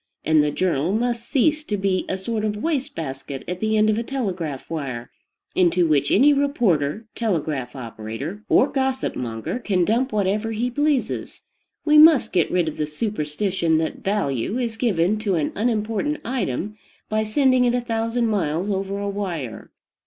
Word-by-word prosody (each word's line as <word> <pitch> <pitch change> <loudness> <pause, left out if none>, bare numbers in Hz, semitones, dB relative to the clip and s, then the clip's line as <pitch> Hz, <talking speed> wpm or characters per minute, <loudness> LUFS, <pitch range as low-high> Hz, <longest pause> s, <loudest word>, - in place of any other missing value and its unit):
And 155 -1 +4
the 150 - +1
journal 165 +1 0
must 235 +1 -1
cease 305 +2 +2
to 210 - -2
be 190 -1 0
a 190 - -1
sort 215 +3 -3
of 210 -1 -1
waste 285 +2 -2
basket 135 -3 -5
at 180 0 -4
the 220 +1 +1
end 215 0 +4
of 215 +1 +2
a - - -2
telegraph 185 - -3
wire, 135 -7 -5 0.4
into 180 -1 +3
which 150 -4 +2
any 285 +7 +5
reporter, 225 - +1
telegraph 155 - -2
operator, 120 - -6
or - - +5
gossip 265 -2 -1
monger 115 - -4
can 190 -7 +1
dump 245 +6 +1
whatever 210 +2 0
he 240 +3 -1
pleases. 290 0 -1 0.4
We 300 -1 +6
must 305 -7 +7
get 175 -4 +2
rid 175 -2 +1
of 155 - -4
the 150 - -1
superstition 165 0 -1
that 160 0 -2
value 195 - -1
is 235 -3 -2
given 210 -3 +1
to 205 -4 0
an 155 -3 0
unimportant 225 +6 -1
"item" 215 - -2 0.3
by 215 0 0
sending 255 +3 +3
it 245 0 +2
a - - +2
thousand 230 0 -1
miles 195 -3 0
over 195 0 -2
a 200 0 -3
wire. 175 - -4
205 Hz, 170 wpm, -23 LUFS, 160-235 Hz, 0.4 s, must